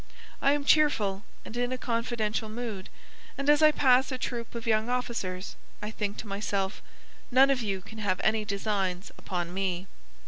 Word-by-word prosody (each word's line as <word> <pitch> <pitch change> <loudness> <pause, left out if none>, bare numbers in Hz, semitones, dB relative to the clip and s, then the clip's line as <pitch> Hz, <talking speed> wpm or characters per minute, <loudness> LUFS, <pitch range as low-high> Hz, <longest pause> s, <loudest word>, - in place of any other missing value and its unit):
I 275 - +5
am 290 -1 -1
cheerful 215 -11 +3 0.2
and 220 - -8
in 245 +1 0
a 255 - -1
confidential 230 -3 -1
mood, 215 -4 -5 0.5
and 275 - -3
as 295 +1 +4
I 310 0 +8
pass 265 -2 +4
a 255 - -2
troop 240 -2 -4
of 230 0 -5
young 220 0 +2
officers 230 -7 -2 0.2
I 210 +1 -5
think 205 -2 -3
to 225 - -6
myself: 195 -1 -2 0.5
None 265 +2 +6
of 265 -2 +1
you 195 -4 -2
can 220 +3 -11
have 190 -4 0
any 215 0 +2
designs 200 -3 -2
upon 175 -2 -3
me." 185 -1 -1
220 Hz, 175 wpm, -29 LUFS, 195-250 Hz, 0.5 s, I